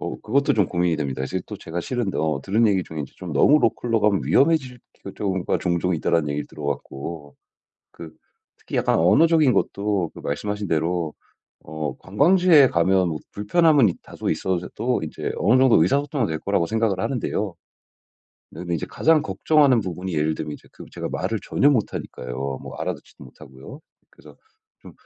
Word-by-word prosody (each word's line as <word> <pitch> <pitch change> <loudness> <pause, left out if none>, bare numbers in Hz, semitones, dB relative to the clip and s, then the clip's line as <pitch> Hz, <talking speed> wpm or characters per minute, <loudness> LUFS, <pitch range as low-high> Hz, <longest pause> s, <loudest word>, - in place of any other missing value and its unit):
어 - - -5
그것도 140 -2 +1
좀 105 -5 +2
고민이 85 -2 0
됩니다. 70 -3 -3
이제 90 +7 -3
또 - - -7
제가 85 +2 -5
실은 120 -1 -3
어 75 -3 -1
들은 110 +7 +2
얘기 95 -3 +2
중에 80 -3 -6
'좀 90 -4 -7
너무 145 - +5
로컬로 115 0 0
가면 105 -2 +2
위험해질 135 -5 +2 0.3
경우가 95 -3 -1
종종 90 0 0
있다.'라는 80 -1 0
얘기를 75 0 -3
들어 75 - -10
갖고. 70 +1 -6 0.5
그 80 -2 -11 0.4
특히 - - -7
약간 - - +2
언어적인 155 - +4
것도 100 -3 -1
그 - - -10
말씀 75 +9 -3
하신 105 -2 -3
대로 80 0 -1 0.5
어 75 -1 -5
관광지에 155 - +4
가면 90 +1 +2
뭐 80 -2 -3
불편함은 145 +4 +3
있 90 - -3
다소 - - -5
있어도 90 -2 -2
인제 - - -4
어느 115 +7 +3
정도 125 -11 +5
의사소통은 140 - +1
될 80 - -3
거라고 95 -1 0
생각을 110 -4 0
하는데요. 105 -7 -2 1.0
네 80 - -10
근데 85 -1 -3
이제 80 - -3
가장 160 -1 +2
걱정하는 145 -6 +3
부분이 90 -1 -5
예를 80 +1 0
들면 75 -1 -5
이제 - - -15
그 - - -12
제가 - - -5
말을 - - -2
전혀 145 - +2
못하니까요. 65 - -3
뭐 - - -9
알아 - - -2
듣지도 - - -16
못하고요. 65 +1 -13 0.3
그래서 - - -18 0.5
좀 - - -13
95 Hz, 375 characters per minute, -23 LUFS, 80-120 Hz, 1.0 s, 너무